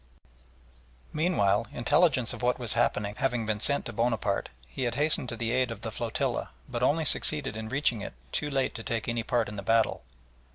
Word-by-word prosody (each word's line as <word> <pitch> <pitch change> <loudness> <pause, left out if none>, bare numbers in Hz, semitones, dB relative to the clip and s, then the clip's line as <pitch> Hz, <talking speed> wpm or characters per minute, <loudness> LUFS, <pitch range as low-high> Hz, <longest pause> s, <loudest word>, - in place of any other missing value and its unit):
Meanwhile, 120 - +2
intelligence 135 -1 +3
of - - -8
what 125 0 +2
was 120 -3 -1
happening 105 -3 +1
having 125 -4 0
been 110 -1 -1
sent 140 +6 +2
to 120 - -5
Bonaparte, 115 -3 0 0.2
he 130 - -3
had 120 - -1
hastened 145 -4 +1
to - - -4
the 115 0 -1
aid 130 0 +2
of 115 -3 -6
the 115 -1 -4
flotilla, 115 +1 -2 0.2
but - - -4
only 160 +2 +2
succeeded 145 -9 +1
in 110 0 -5
reaching 125 -4 +1
it - - -6 0.2
too 150 - -1
late 135 -2 0
to 115 - -6
take 115 0 -3
any 115 0 0
part 115 0 0
in 105 - -7
the - - -3
battle. 115 +3 +2
120 Hz, 200 wpm, -29 LUFS, 110-135 Hz, 0.2 s, intelligence